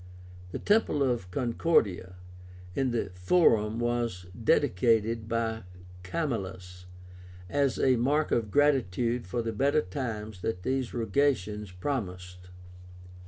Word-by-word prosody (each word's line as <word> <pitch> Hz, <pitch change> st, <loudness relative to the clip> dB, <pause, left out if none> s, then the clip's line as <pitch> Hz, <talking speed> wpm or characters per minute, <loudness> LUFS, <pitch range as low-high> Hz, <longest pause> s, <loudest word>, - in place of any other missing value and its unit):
The -, -, -5 dB
temple 205 Hz, -9 st, +2 dB
of 120 Hz, -8 st, -1 dB
CONCORDIA 105 Hz, -, 0 dB, 0.6 s
in 135 Hz, +3 st, 0 dB
the 120 Hz, -5 st, -2 dB
Forum 105 Hz, -, +3 dB
was 120 Hz, -6 st, -1 dB, 0.2 s
dedicated 115 Hz, +2 st, +2 dB
by 115 Hz, -1 st, -1 dB, 0.4 s
Camillus 95 Hz, -, -4 dB, 0.6 s
as 140 Hz, +6 st, +1 dB
a 130 Hz, -2 st, +3 dB
mark 145 Hz, +6 st, +1 dB
of 115 Hz, -3 st, +1 dB
gratitude 125 Hz, -5 st, +1 dB
for 120 Hz, +5 st, -2 dB
the 115 Hz, 0 st, -3 dB
better 140 Hz, +7 st, +2 dB
times 105 Hz, -2 st, -5 dB
that 90 Hz, -4 st, -3 dB
these 130 Hz, -2 st, -1 dB
rogations 110 Hz, -3 st, 0 dB
promised. 90 Hz, -4 st, -5 dB
115 Hz, 110 wpm, -29 LUFS, 90-130 Hz, 0.6 s, Forum